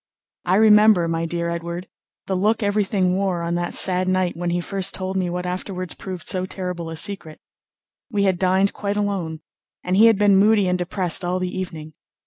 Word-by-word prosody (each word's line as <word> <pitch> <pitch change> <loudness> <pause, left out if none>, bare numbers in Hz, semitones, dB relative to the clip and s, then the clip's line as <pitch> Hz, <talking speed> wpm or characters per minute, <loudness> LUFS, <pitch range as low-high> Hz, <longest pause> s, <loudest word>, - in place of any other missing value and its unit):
I 180 +1 +2
remember, 210 -4 +5
my 165 0 -2
dear 170 0 -3
Edward, 170 +1 -5 0.4
the 195 - -3
look 210 +4 +1
everything 200 -3 +1
wore 190 -3 -1
on 170 0 -2
that 175 0 -2
sad 185 -1 +4
night 185 -1 0
when 175 +1 -3
he 175 +1 0
first 195 +1 -1
told 190 0 -4
me 185 -2 -1
what 180 +1 -4
afterwards 185 0 -5
proved 185 -2 -8
so 185 0 -1
terrible 180 -3 -5
a 165 - -6
secret. 175 -4 -3 0.7
We 205 -3 0
had 190 -3 +1
dined 190 +1 +2
quite 205 0 -3
alone, 185 -6 -2 0.4
and 180 - -1
he 220 +4 +7
had 225 -3 +4
been 205 -1 +4
moody 205 0 +4
and 180 0 0
depressed 180 0 0
all 180 +1 -1
the 185 0 -4
evening. 160 -4 -6
185 Hz, 195 wpm, -21 LUFS, 175-200 Hz, 0.7 s, he